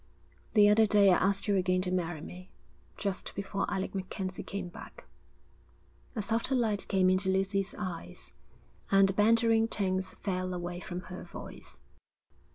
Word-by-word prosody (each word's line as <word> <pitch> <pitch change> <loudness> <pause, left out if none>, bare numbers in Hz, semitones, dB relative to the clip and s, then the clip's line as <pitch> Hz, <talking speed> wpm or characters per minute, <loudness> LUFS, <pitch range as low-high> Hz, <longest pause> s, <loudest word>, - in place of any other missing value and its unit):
'The 210 -2 +7
other 215 +1 +5
day 200 -2 +6
I - - +4
asked 195 +2 +1
you 205 - +3
again 185 0 +2
to 180 - -2
marry 175 -3 -2
me, 180 +3 -10 0.5
just 195 -2 -3
before 195 0 -2
Alec 190 0 -2
MacKenzie 190 0 -4
came 195 -2 -5
back.' 175 - -11 1.1
A 215 - -1
softer 230 +5 0
light 220 -5 0
came 190 -1 +3
into 185 +1 +2
Lucy's 195 +1 0
eyes, 90 - -6 0.6
and 195 0 +6
the - - 0
bantering 225 +2 +4
tones 190 -3 -1
fell 185 -2 -3
away 175 0 -4
from 180 0 -6
her 180 0 -8
voice. - - -10
190 Hz, 155 wpm, -30 LUFS, 185-205 Hz, 1.1 s, The